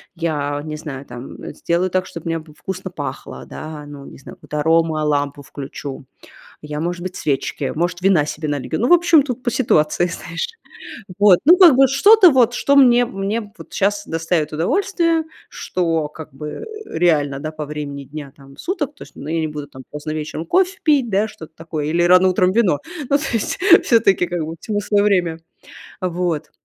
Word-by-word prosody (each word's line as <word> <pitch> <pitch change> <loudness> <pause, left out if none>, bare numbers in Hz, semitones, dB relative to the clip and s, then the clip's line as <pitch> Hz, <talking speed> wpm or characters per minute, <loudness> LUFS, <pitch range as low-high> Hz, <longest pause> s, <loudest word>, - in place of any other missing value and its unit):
Я 145 -4 -2
не 155 0 -5
знаю, 145 -3 -7
там, 125 +1 -10
э, - - -7
сделаю 175 +2 0
так, 185 0 0
чтобы 165 - -9
у - - -4
меня 165 - -1
б 155 0 -15
вкусно 190 0 -6
пахло, - - -7
да, 155 -1 -8
ну, 145 -1 -10
не - - -12
знаю, 135 - -12
какую-то 150 - -6
аромолампу 150 -3 +1
включу. 135 0 -8 0.6
Я, 150 0 -5
может 175 +1 -3
быть, 185 0 -5
свечки, 140 0 -2
может, 175 +2 -1
вина 185 -5 +3
себе 150 0 -5
налью. 145 -2 -3
Ну, 240 - +2
в - - +5
общем, 340 -3 +5
тут 255 -2 -5
по 240 - 0
ситуации, 175 -9 +2
знаешь. 165 -1 -5 0.7
Вот, 205 -4 +6
ну, 345 +5 +8
как 345 -7 +8
бы 270 0 +6
что-то 370 - +6
вот, 245 -2 +4
что 280 - +1
мне 245 -3 +6
мне 205 +1 -3
вот - - -13
щас 205 +1 0
доставит 165 -1 -1
удовольствие, 330 - +1 0.3
что 165 -4 -2
как 150 -2 -11
бы, 150 +3 -7
э, 150 - -7 0.3
реально, 145 -5 +2
да, 155 +2 -5
по 155 -1 -5
времени 145 -1 -6
дня, 145 0 -9
там, 135 -1 -17
суток, 340 -6 -3
то - - -10
есть, - - -17
ну, 145 - -8
я 165 - 0
не 160 - -1
буду, 150 -1 -7
там, 130 -2 -12
поздно 150 +1 -6
вечером 155 +1 -4
кофе 375 - +1
пить, 285 -6 +3
да, 210 +2 +1
что-то 160 -7 -12
такое, 160 -2 -5
или 170 +3 +1
рано 180 +1 +6
утром 185 0 +2
вино. 190 -8 +2 0.3
Ну, 280 - +4
то 300 - -6
есть, 225 - -1 0.3
все-таки 200 -6 +3
как 175 -2 -3
бы 160 +1 -6
всему 205 -2 -2
свое 205 0 +2
время. 175 -5 +1 0.6
Вот. 175 -3 -2
170 Hz, 195 wpm, -20 LUFS, 150-210 Hz, 0.7 s, ну